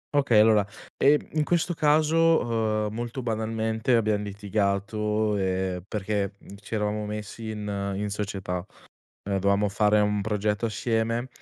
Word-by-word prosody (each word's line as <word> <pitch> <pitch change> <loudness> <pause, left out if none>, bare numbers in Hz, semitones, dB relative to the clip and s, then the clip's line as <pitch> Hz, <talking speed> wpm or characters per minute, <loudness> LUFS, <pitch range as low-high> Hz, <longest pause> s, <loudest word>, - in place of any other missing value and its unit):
Okay, 135 -7 +4
allora, 105 -1 +5 0.3
ehm, 145 +1 +3
in 155 -1 +1
questo 175 +2 +1
caso, 160 +2 +4 0.5
uhm, 105 - -6
molto 120 +3 -4
banalmente 110 +1 0
abbiam 105 -2 +1
litigato, 105 +1 -1
ehm, 95 -1 -1
perché 105 -1 -2 0.3
ci 105 - -5
eravamo 105 0 -1
messi 105 +1 -6
in 105 -1 -5 0.3
in 105 +1 -2
società. 95 -3 -3 0.6
Ehm, 100 -1 -1
dovevamo 100 +1 +2
fare 105 +1 +3
un 105 0 +1
progetto 105 +2 -1
assieme 115 +2 -1
105 Hz, 130 wpm, -26 LUFS, 100-115 Hz, 0.6 s, allora